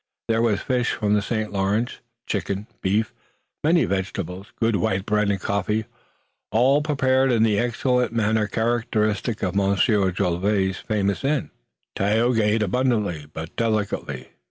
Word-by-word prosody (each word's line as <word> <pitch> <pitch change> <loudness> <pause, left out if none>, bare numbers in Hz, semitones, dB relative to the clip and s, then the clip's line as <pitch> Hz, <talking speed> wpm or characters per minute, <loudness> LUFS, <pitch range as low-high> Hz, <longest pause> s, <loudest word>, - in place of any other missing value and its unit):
There 115 0 +2
was 110 -4 +2
fish 125 -2 0
from 105 -1 0
the 105 - +3
St. 110 0 -3
Lawrence, 100 +5 0 0.3
chicken, 100 0 -2 0.2
beef, 105 +3 0 0.5
many 165 +2 +4
vegetables, 95 0 -4
good 115 -2 +2
white 95 +2 0
bread 105 -1 +1
and 100 -1 0
coffee, 100 +3 -1 0.7
all 130 +6 +4
prepared 135 -3 +2
in 115 -2 +3
the 105 -2 +3
excellent 125 +1 +1
manner 110 -1 +1
characteristic 110 -1 0
of 90 -2 0
Monsieur 100 +1 +2
Jolivet's 95 +1 0
famous 100 -1 -1
inn. 140 0 0 0.4
Tayoga 110 +3 +2
ate 105 +1 +2
abundantly 105 - 0
but 80 +1 -7
delicately. 110 -3 -2
105 Hz, 135 wpm, -23 LUFS, 100-120 Hz, 0.7 s, many